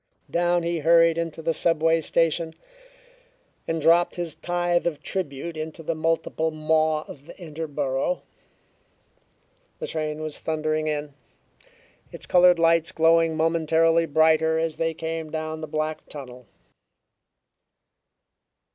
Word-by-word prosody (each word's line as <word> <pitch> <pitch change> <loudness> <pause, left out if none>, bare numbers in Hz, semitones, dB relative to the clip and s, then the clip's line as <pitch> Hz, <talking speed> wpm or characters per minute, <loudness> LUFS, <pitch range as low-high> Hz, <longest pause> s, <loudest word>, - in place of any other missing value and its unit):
Down 175 0 +1
he 170 0 -1
hurried 165 +1 +4
into 165 -1 -4
the 165 +1 +1
subway 165 0 +2
station, 165 0 0 1.1
and 165 0 -1
dropped 170 +3 +3
his 175 -3 -3
tithe 175 0 -1
of 155 -3 -4
tribute 165 -2 -3
into 155 +1 -6
the 165 - -1
multiple 160 0 -1
maw 155 0 +1
of 145 -1 -13
the - - -11
Interborough. 150 - -3 1.5
The - - -5
train 155 -1 -4
was 155 -1 -4
thundering 155 0 -1
in, 150 -1 -3 1.0
its - - -10
colored 180 -1 +5
lights 165 0 +3
growing 165 0 +3
momentarily 165 +1 +2
brighter 160 +1 +3
as 160 -1 -2
they 165 -1 -1
came 160 0 -4
down 155 0 -4
the 155 - -5
black 155 0 -3
tunnel. 125 -4 -10
160 Hz, 120 wpm, -24 LUFS, 155-165 Hz, 1.5 s, colored